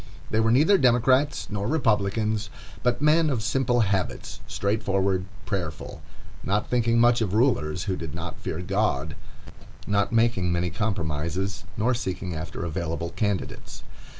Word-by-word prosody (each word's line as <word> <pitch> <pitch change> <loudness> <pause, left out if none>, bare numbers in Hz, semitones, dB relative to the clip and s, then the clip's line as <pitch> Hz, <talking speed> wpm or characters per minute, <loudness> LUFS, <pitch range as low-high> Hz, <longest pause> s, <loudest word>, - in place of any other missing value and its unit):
They 110 - +2
were 110 0 +3
neither 155 - +5
Democrats 130 +2 +3
nor 105 0 -2
Republicans, 110 -5 +1 0.3
but 125 +2 0
men 155 +1 +4
of 120 -6 -1
simple 120 +1 +1
habits, 95 -3 -1
straightforward, 100 -3 0 0.2
prayerful; 90 -6 -4 0.4
not 100 +2 0
thinking 115 -1 +2
much 120 0 +4
of 105 -2 0
rulers 90 - +1
who 95 -1 -1
did 80 -3 -6
not 85 +1 -6
fear 80 - -4
God, 90 -6 -1 0.7
not 100 +1 +1
making 115 -6 +2
many 85 0 0
compromises, 95 -2 -2
nor 115 +4 +2
seeking 95 -6 -3
after 80 +2 -5
available 85 0 -3
candidates. 105 -2 -3
105 Hz, 135 wpm, -25 LUFS, 90-120 Hz, 0.7 s, neither